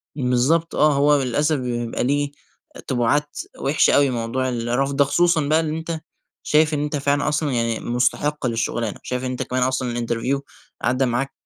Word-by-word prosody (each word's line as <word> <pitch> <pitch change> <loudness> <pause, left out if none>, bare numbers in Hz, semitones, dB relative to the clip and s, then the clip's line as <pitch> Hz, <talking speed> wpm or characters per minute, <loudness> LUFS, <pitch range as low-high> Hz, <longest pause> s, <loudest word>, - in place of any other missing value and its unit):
بالضبط 135 +5 +1
آه، 150 -1 +4
هو 145 +1 +3
للأسف 145 +5 +1
بيبقى 120 -2 -3
ليه 145 +2 0 0.6
تبُعات 130 +3 0 0.2
وحشة 140 +3 +3
أوي 140 -1 +4
موضوع 125 +2 -2
الرفض 125 +3 -1
ده، 140 - +5
خصوصًا 170 +2 +2
بقى 155 +2 +3
إن 155 -1 -2
أنت 160 0 -5 0.4
شايف 155 +1 +3
إن 145 - 0
أنت 150 0 -2
فعلًا 145 0 0
أصلًا 150 -1 0
يعني 115 -2 0
مُستحق 130 +3 0
للشغلانة، 115 -1 -2
شايف 125 0 -3
إن 130 - -2
أنت 125 - -3
كمان 125 0 -1
أصلًا 130 -1 -1
الInterview 120 +3 -1 0.4
عدى 130 +2 +1
معاك 125 +3 -1
135 Hz, 170 wpm, -22 LUFS, 120-150 Hz, 0.6 s, ده